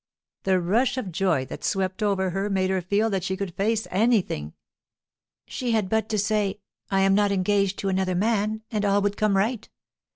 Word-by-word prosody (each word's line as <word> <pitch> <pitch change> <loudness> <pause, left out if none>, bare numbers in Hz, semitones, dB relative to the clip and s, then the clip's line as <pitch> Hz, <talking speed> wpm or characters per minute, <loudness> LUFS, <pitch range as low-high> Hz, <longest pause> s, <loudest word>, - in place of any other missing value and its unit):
The 190 -1 +3
rush 230 +9 +1
of 205 -8 -3
joy 170 -6 +1
that - - -9
swept 190 0 -1
over 195 -3 +1
her 195 +3 -2
made 190 -1 +1
her 190 -1 0
feel 205 +5 +1
that 190 -3 -1
she 190 +1 -2
could 195 -3 -4
face 215 +4 0
anything. 190 - +1 0.9
She 245 -2 -3
had 210 -4 +1
but 220 0 0
to 215 - 0
say, 210 -1 0 0.3
'I 195 -1 +2
am 195 0 +4
not 205 0 +3
engaged 195 0 +1
to 195 - -2
another 190 -1 0
man,' 215 +2 0
and 210 -2 -1
all 200 0 +2
would 205 0 0
come 210 -2 +2
right. 220 +3 -1
200 Hz, 195 wpm, -25 LUFS, 190-215 Hz, 0.9 s, am